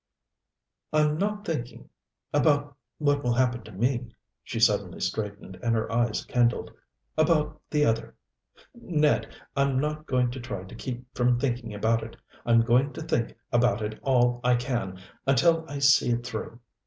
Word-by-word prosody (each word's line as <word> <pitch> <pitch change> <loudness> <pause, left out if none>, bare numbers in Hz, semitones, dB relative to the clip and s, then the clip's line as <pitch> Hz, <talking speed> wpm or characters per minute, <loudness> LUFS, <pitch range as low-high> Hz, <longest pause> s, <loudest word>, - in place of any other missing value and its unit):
"I'm 150 0 +2
not 210 +1 -1
thinking 120 - -4 0.5
about 145 -1 +2 0.2
what 145 -1 +1
will 120 -1 +2
happen 125 -1 +1
to 110 - -11
me." 120 +4 0 0.4
She 115 - -4
suddenly 100 -5 +2
straightened, 100 0 -4
and 115 -1 +1
her 110 - -1
eyes 120 -1 0
kindled. 120 -1 +1 0.5
"About 155 -2 +2
the 150 -1 +2
other 115 -3 -1 0.6
Ned, 155 -10 +1 0.2
I'm 140 -1 +2
not 150 +2 -2
going 125 -1 +1
to 130 - -6
try 120 -7 -5
to 95 - -12
keep 125 -1 -6
from 125 -1 +2
thinking 120 -3 -2
about 115 +2 +1
it. 115 - -9 0.3
I'm 115 -1 +6
going 125 +5 +2
to - - -7
think 115 -6 -1
about 120 -3 +2
it 110 +1 -4
all 120 -2 +2
I 125 0 +4
can, 120 -7 -2 0.3
until 160 +5 +4
I 145 - -4
see 140 -2 +5
it 120 0 0
through. 115 0 -6
125 Hz, 160 wpm, -27 LUFS, 115-145 Hz, 0.6 s, I'm